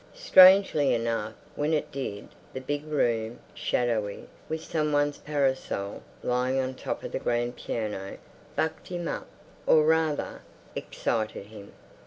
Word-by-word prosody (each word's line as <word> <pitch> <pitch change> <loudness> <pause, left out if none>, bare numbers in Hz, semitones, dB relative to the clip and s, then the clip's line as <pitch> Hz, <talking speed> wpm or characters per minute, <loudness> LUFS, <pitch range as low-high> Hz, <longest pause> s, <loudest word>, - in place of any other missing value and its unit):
Strangely 190 - +7
enough, 115 -1 -2 0.2
when 150 +2 +1
it 150 - -2
did, 115 -7 -5 0.2
the 130 - -4
big 145 +3 -3
room, 115 -6 0 0.2
shadowy, 110 -4 -1 0.2
with 160 0 -3
some 155 -2 -1
one's 145 0 +1
parasol 135 -8 -1 0.2
lying 125 +2 +1
on 130 0 -1
top - - -5
of - - -5
the - - -2
grand 120 +1 0
piano, 105 -3 -4 0.4
bucked 160 - -1
him 175 -2 -4
up—or 155 -1 0
rather, 160 -2 +1 0.3
excited 110 -3 -2
him. 105 -1 -12
130 Hz, 130 wpm, -28 LUFS, 115-155 Hz, 0.4 s, Strangely